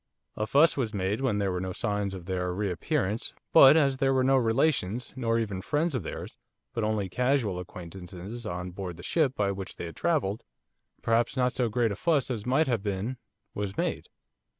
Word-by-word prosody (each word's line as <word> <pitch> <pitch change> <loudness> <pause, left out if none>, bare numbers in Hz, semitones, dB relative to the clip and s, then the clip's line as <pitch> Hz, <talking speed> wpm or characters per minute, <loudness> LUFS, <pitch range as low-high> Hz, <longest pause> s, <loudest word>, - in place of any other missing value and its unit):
A 110 - -2
fuss 150 +7 +5
was 115 -6 -2
made 100 +4 -1
when 125 -6 +1
there 100 -2 0
were 90 0 -2
no 95 0 -3
signs 100 -1 -1
of 90 -2 -9
their 90 -1 -1
re 100 -1 -1
appearance, 95 +5 -1 0.2
but 140 +3 +9
as 140 -4 +3
there 135 0 +2
were 130 - +3
no 135 +1 +4
relations, 125 -2 +1
nor 115 -3 +1
even 100 -5 -2
friends 155 - 0
of 130 - -1
theirs, 80 - -7 0.3
but 115 - -1
only 105 -2 0
casual 125 -2 +1
acquaintances 90 +5 -8
on 90 +1 -4
board 90 -2 -6
the 85 - -10
ship 145 -6 +1
by 100 -1 +1
which 95 -1 -6
they - - -6
had 85 - -8
travelled, 130 - 0 0.6
perhaps 115 +3 +1
not 125 0 +2
so 125 -3 +1
great 115 0 +1
a - - -2
fuss 145 - +1
as 115 -2 -4
might 135 +5 +3
have 120 -7 0
been 105 +5 -3 0.4
was 100 -1 -4
made. - - -2
110 Hz, 200 wpm, -28 LUFS, 95-130 Hz, 0.6 s, but